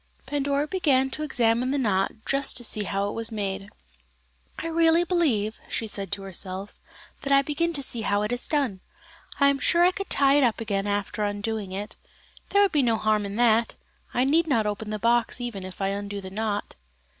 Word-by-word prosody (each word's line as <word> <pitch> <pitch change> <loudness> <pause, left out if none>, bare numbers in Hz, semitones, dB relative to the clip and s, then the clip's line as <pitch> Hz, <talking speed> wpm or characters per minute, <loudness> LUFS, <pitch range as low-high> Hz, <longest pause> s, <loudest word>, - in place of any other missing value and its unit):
Pandora 280 +1 0
began 280 -6 +1
to 305 - -3
examine 245 -4 +1
the 285 - 0
knot 200 -7 +1
just 275 +1 +1
to 240 - -2
see 215 -2 0
how 200 +1 -1
it - - -3
was 230 0 -1
made. 200 -2 -3 0.9
"I - - -5
really 330 +1 +4
believe," 270 - +1
she 225 - -2
said 200 -3 -4
to 200 -1 -2
herself, 190 +1 -6 0.4
"that 275 - -3
I 275 0 +6
begin 310 +4 0
to 285 -3 -1
see 235 -3 0
how 205 -1 +1
it 210 - -2
is 245 0 0
done. 270 -11 0 0.6
I 280 -1 +6
am 280 -1 0
sure 340 +4 +3
I 365 - +5
could 395 +1 -6
tie 275 0 +4
it - - +3
up 235 -3 +2
again 205 -3 -2
after 205 +1 -2
undoing 205 -1 -3
it. 200 +2 -6 0.5
There 405 0 +4
could 395 - +2
be 295 - +3
no 230 -3 +2
harm 215 -1 +1
in 200 - -6
that; 230 0 +3 0.4
I 245 - +1
need 320 +5 +3
not 230 -7 +2
open 210 +1 -3
the 215 - -2
box 235 +2 +1
even 235 -6 -5
if 185 0 -9
I 195 - +1
undo 200 0 -4
the 190 -1 -9
knot." 210 0 -3
225 Hz, 210 wpm, -25 LUFS, 205-280 Hz, 0.9 s, I